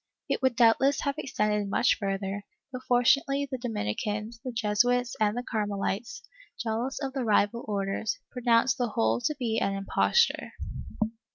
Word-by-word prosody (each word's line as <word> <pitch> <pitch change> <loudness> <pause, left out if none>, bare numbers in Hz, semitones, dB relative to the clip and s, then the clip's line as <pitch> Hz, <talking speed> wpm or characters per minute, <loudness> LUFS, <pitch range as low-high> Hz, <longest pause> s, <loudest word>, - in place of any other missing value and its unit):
It - - -1
would 260 -2 +2
doubtless 250 +4 +4
have 280 -1 -2
extended 210 -5 0
much - - +2
further, 195 0 -2 0.3
but 255 -1 -6
fortunately 275 +3 +3
the 260 - -3
Dominicans, 215 - -3
the 255 - -4
Jesuits 240 +2 +1
and 215 +1 +2
the 245 - -2
Carmelites, 210 - -3 0.4
jealous 235 +4 -2
of 270 -2 -4
the 270 -2 -2
rival 215 +1 +2
Orders, 200 0 -1
pronounced 235 -1 +2
the 245 - +1
whole 115 - +1
to 300 - 0
be 230 -4 0
an 195 - 0
imposture. 330 - +1
230 Hz, 150 wpm, -28 LUFS, 205-255 Hz, 0.4 s, doubtless